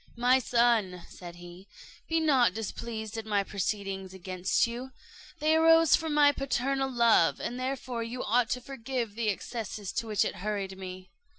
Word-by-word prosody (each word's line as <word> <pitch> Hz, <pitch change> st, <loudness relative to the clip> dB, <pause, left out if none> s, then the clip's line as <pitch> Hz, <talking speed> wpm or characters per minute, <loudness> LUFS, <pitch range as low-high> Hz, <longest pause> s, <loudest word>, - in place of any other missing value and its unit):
"My 250 Hz, +2 st, +4 dB
son," 230 Hz, -7 st, +1 dB
said 175 Hz, -1 st, -10 dB
he, 175 Hz, +2 st, -12 dB, 0.4 s
"be 325 Hz, 0 st, +2 dB
not 265 Hz, -, +3 dB
displeased 225 Hz, 0 st, -5 dB
at 220 Hz, -, -7 dB
my 205 Hz, -2 st, +1 dB
proceedings 195 Hz, -1 st, -3 dB
against 185 Hz, +2 st, 0 dB
you; 245 Hz, +3 st, -6 dB, 0.4 s
they 310 Hz, 0 st, +2 dB
arose 325 Hz, 0 st, +6 dB
from 320 Hz, -2 st, -2 dB
my 290 Hz, -1 st, +6 dB
paternal 270 Hz, 0 st, -1 dB
love, 235 Hz, -9 st, +3 dB
and 245 Hz, +1 st, -4 dB
therefore 255 Hz, -2 st, -3 dB
you 235 Hz, +2 st, -4 dB
ought 235 Hz, +1 st, +2 dB
to 250 Hz, -, -2 dB
forgive 245 Hz, -3 st, -4 dB
the 225 Hz, 0 st, -1 dB
excesses 205 Hz, 0 st, -4 dB
to 230 Hz, -, -3 dB
which 210 Hz, -3 st, +1 dB
it -, -, -4 dB
hurried 200 Hz, -1 st, -3 dB
me." 185 Hz, -1 st, -9 dB
230 Hz, 165 wpm, -29 LUFS, 195-260 Hz, 0.4 s, arose